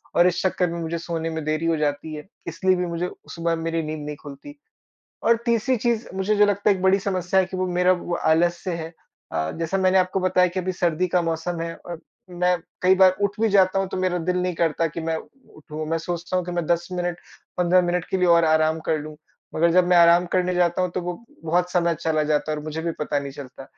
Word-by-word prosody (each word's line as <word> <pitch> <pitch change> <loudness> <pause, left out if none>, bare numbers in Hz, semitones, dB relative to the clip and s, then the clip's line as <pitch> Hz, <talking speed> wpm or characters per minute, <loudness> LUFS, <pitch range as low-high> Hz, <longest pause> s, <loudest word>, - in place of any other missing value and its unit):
और 175 +1 +6
इस 180 - 0
चक्कर 180 -1 +1
में 170 - -4
मुझे 165 +1 -3
सोने 165 -1 -3
में 160 -1 -4
देरी 155 +1 -1
हो 165 -1 +1
जाती 150 +1 -2
है 150 +2 -9 0.2
इसलिए 190 -1 +1
भी 180 0 -1
मुझे 170 +1 -3 0.3
सुबह 165 0 0
मेरी 165 0 -2
नींद 155 -1 -5
नहीं 150 - -5
खुलती। 150 - -11 0.7
और 230 - +5
तीसरी 235 +2 +2
चीज़ 235 0 -1
मुझे 195 +3 0
जो 210 - +5
लगता 205 0 +1
है 200 - +4
एक 185 - -7
बड़ी 190 +1 +4
समस्या 185 -1 0
है 190 - +3
कि 185 0 -7
वो 185 0 0
मेरा 180 +1 +2
वो 175 -1 -3
आलस्य 170 +3 +1
है। 165 0 -6 0.4
अ, 80 0 -2
जैसा 165 +3 -1
मैंने 190 0 +3
आपको 185 +1 +1
बताया 185 0 +3
कि 185 +2 -3
अभी 185 +1 -2
सर्दी 175 -1 0
का 180 0 +1
मौसम 165 +1 -2
है 165 0 -4
और 170 -2 -9 0.3
मैं 180 0 +1 0.2
कई 185 +1 +5
बार 185 -1 +5
उठ 200 +1 -1
भी 225 - +3
जाता 195 -1 +4
हूँ 195 - -1
तो - - -4
मेरा 185 -1 0
दिल 180 +2 -1
नहीं 180 -1 -1
करता 165 0 +1
कि 165 +2 -6
मैं 160 0 -1 0.4
उठूँ। 155 0 -7
मैं 165 - +1
सोचता 175 +2 -3
हूँ 180 - -1
कि 175 - -5
मैं 175 -1 -2
10 170 +1 0
मिनट, 175 -1 -2 0.4
15 180 +1 +4
मिनट 175 -1 -1
के 190 - 0
लिए 180 - +2
और 170 -1 +5
आराम 160 0 +2
कर 160 - +2
लूँ। 155 +1 -8 0.4
मगर 170 +1 +3
जब 180 +1 +4
मैं 180 -1 +5
आराम 170 +1 +6
करने 180 0 +1
जाता 175 0 +2
हूँ 180 - 0
तो 185 - -3
वो 175 0 -3 0.3
बहुत 175 +2 0
समय 170 -2 +1
चला 155 -2 0
जाता 150 0 0
है 155 - -2
और 150 - -7
मुझे 155 +1 -4
भी 165 0 -1
पता 145 -1 -1
नहीं 140 -1 -6
चलता 135 -1 -10
175 Hz, 245 wpm, -23 LUFS, 160-185 Hz, 0.7 s, और